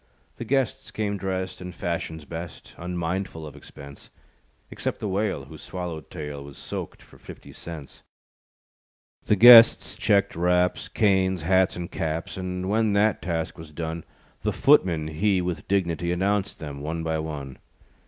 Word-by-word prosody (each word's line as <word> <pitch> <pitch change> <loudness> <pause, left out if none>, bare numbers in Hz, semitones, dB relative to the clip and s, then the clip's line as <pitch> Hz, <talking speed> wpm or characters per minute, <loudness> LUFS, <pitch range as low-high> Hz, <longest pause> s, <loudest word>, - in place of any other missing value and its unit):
The 120 - -6
guests 135 -1 0
came 105 -2 -2
dressed, 95 -1 -3
In 90 0 -6
fashion's 80 -2 -4
best, 85 +1 -8
Unmindful 90 -1 -3
of 75 -2 -10
expense; 70 -1 -12 0.6
Except - - -3
the 105 - -3
whale, 100 +1 -1
Whose - - -12
swallowtail, 80 -4 -6
Was 70 -1 -12
"soaked" - - -7
for - - -19
fifty - - -12
cents. 80 -5 -9 1.3
The 105 - +4
guests 115 +2 +9
checked 100 -2 +2
wraps, 90 +1 +1
Canes, 95 -4 +2
hats 95 +2 +3
and 85 -1 -6
caps; 80 0 -3
And 90 0 -4
when 110 +1 +2
that 105 0 +2
task 85 -3 -3
was 80 -1 -10
done, 80 +1 -5 0.4
The - - 0
footman 80 -4 +3
he 95 +5 +1
With 90 -1 -3
dignitee, 85 -3 0
Announced 100 +2 0
them 70 -3 -7
one 80 +2 -3
by 80 -1 -1
one. 75 -4 -6
90 Hz, 145 wpm, -25 LUFS, 80-95 Hz, 1.3 s, guests